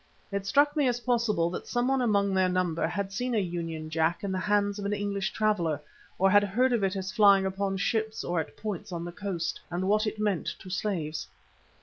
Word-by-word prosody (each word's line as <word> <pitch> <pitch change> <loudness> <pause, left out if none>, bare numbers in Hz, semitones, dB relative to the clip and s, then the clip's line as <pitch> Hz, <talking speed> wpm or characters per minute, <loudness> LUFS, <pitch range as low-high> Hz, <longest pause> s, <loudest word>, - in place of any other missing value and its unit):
It 200 0 -3
struck 290 +7 +4
me 290 -3 +3
as 245 -1 0
possible 230 -9 +1
that - - -6
someone 255 +2 +1
among 200 -4 +2
their 190 -1 +3
number 180 -3 0
had 190 +3 -3
seen 245 +3 -1
a - - +2
Union 170 -4 -3
Jack 160 +4 0
in 200 - -2
the 185 - -1
hands 205 +1 +1
of 200 - -4
an 200 - 0
English 200 -1 -1
traveller, 190 -8 +1 0.4
or 190 - +4
had 205 +1 +6
heard 245 +6 +2
of 230 -4 +1
it 195 0 +1
as 190 0 -3
flying 200 -3 +5
upon 195 0 -1
ships 220 +2 -1
or 175 -1 -1
at 160 - -5
points 205 -4 -5
on 170 -1 -4
the 175 - -5
coast, 175 -3 -3
and 180 +2 -2
what 215 +2 +2
it 215 - -3
meant 205 -4 0
to 185 - -10
slaves. 170 -6 -2
200 Hz, 220 wpm, -28 LUFS, 180-215 Hz, 0.4 s, had